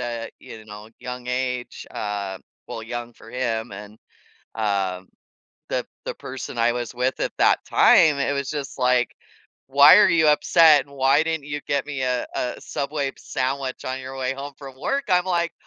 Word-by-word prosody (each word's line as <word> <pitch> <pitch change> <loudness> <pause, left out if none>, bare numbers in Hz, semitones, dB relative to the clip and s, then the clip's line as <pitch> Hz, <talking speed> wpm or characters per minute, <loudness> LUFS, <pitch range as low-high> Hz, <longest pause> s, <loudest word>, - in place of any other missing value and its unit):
a, 120 -2 -4
you 110 -1 -11
know, 105 +1 -11
young 125 0 -7
age, 125 -1 -3
uh, 100 -2 -4 0.3
well, 115 - -6
young 120 +1 -6
for 115 - -15
him 120 -3 -2
and, 105 +2 -10 0.6
uh, 100 -4 -1 0.7
the - - -1 0.2
the - - -3
person 130 -1 -7
I 115 +1 +3
was 120 -1 -4
with 125 +1 -1
at - - -1
that - - +4
time, 150 -3 +5
it 140 +1 0
was 140 -1 -2
just 145 -2 -5
like, 125 -1 +2 0.5
"Why 140 +6 +8
are 210 - +6
you 160 -2 +4
upset? 150 -1 +5
And 140 - -18
why 135 +3 +4
didn't 160 -3 -3
you 145 0 -4
get 140 0 0
me 140 -3 -4
a 125 -1 0
a 125 - -2
Subway 140 -2 -3
sandwich 135 -1 -3
on 130 +1 -3
your 130 +1 -8
way 130 0 -1
home 140 +1 -7
from 135 -2 -11
work?" 275 - -1
I'm 180 0 +3
like, 170 -2 0
130 Hz, 180 wpm, -23 LUFS, 120-145 Hz, 0.7 s, Why